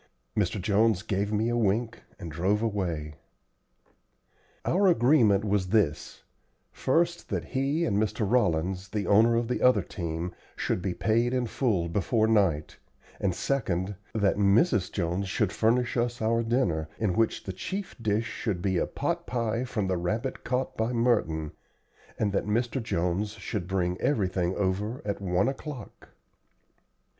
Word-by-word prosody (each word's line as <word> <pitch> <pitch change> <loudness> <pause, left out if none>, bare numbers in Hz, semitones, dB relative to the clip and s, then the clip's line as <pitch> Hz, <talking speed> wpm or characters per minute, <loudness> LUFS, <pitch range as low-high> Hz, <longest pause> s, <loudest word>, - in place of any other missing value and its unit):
Mr. 105 0 0
Jones 105 +1 +2
gave 100 -1 -1
me 110 +2 +1
a 120 - 0
wink 115 +1 0 0.2
and 85 - -7
drove 95 +7 0
away. 85 -9 -2 1.5
Our 195 +3 +3
agreement 120 - +4
was 100 -2 +1
this 95 -7 0 0.5
first, 170 +5 0
that 90 -6 -2
he 140 - 0
and 100 -1 +1
Mr. 110 0 0
Rollins, 95 -4 +1
the 105 -1 -2
owner 115 +3 +5
of 115 0 0
the 125 - -2
other 125 0 +5
team, 85 -1 -4 0.2
should - - -1
be 90 -1 -2
paid 115 +3 +1
in 125 -1 +1
full 110 -8 0
before 105 +5 +1
night; 95 -9 +1 0.4
and 95 -3 0
second, 95 -5 -1 0.2
that 100 -3 +2
Mrs. 105 - +3
Jones 95 +1 -2
should 100 +1 0
furnish 120 +3 +1
us 120 0 0
our 115 +1 +1
dinner, 95 -10 0
in 105 -5 0
which 115 +2 +1
the 95 - -5
chief 190 - -5
dish 110 0 +1
should 110 -5 -3
be 95 -1 0
a - - 0
pot - - -2
pie 115 0 -1
from 115 -5 -2
the 95 -1 0
rabbit 110 +9 -2
caught 125 +1 -1
by 110 +2 0
Merton, 100 -11 +1 0.7
and 105 -2 0
that 100 - 0
Mr. 120 +4 0
Jones 95 0 -1
should 100 -3 -4
bring 90 -1 -1
everything 95 -8 0
over 100 +5 -1
at 100 -1 -3
one 90 +1 +1
o'clock. 135 -3 -7
105 Hz, 150 wpm, -28 LUFS, 95-120 Hz, 1.5 s, owner